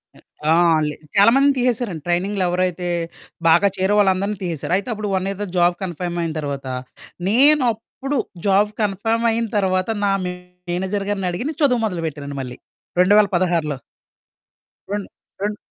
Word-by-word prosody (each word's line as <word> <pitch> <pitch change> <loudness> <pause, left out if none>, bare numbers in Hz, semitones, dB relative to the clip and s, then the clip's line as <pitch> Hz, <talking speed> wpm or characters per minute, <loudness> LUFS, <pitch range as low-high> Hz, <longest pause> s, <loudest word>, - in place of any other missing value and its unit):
అ - - -17 0.3
ఆ! - - +6 0.3
లే 150 - -4 0.2
చాలామందిని 270 +8 +5
తీసేసారండి. 240 - -1
ట్రైనింగ్‌లో 185 +3 0
ఎవరైతే 180 0 -1 0.6
బాగా 170 +5 +5
చేరే 190 +2 +2
వాళ్ళందరిని 200 +1 +2
తీసేసారు. 170 0 -3
అయితే 200 +5 -5
అప్పుడు 210 -1 -4
1 190 +1 -1
ఇయర్‌ 195 0 -5
తరువాత 195 -3 -5
జాబ్ 175 0 +4
కన్ఫర్మ్ 175 -1 -4
అయిన 165 - -2
తర్వాత. 140 -2 -4 0.6
నేనప్పుడు, 260 +2 +3 0.3
జాబ్ 205 +2 +3
కన్ఫర్మ్ 225 +3 0
అయిన 230 +1 -1
తరువాత 185 -1 +1 0.2
నా 200 - +2 0.2
మేనేజర్ 180 +2 -4
గారిని 195 -3 -1
అడిగి 185 +10 -3
నేను 315 0 -7
చదువు 250 -4 +3
మొదలుపెట్టానండి 150 -7 -4
మళ్ళీ 125 -1 -7 0.4
2016లో. 180 -7 +3 1.1
రెన్ 205 -1 -2 0.4
రెన్ 205 0 -2
190 Hz, 140 wpm, -21 LUFS, 175-210 Hz, 1.1 s, ఆ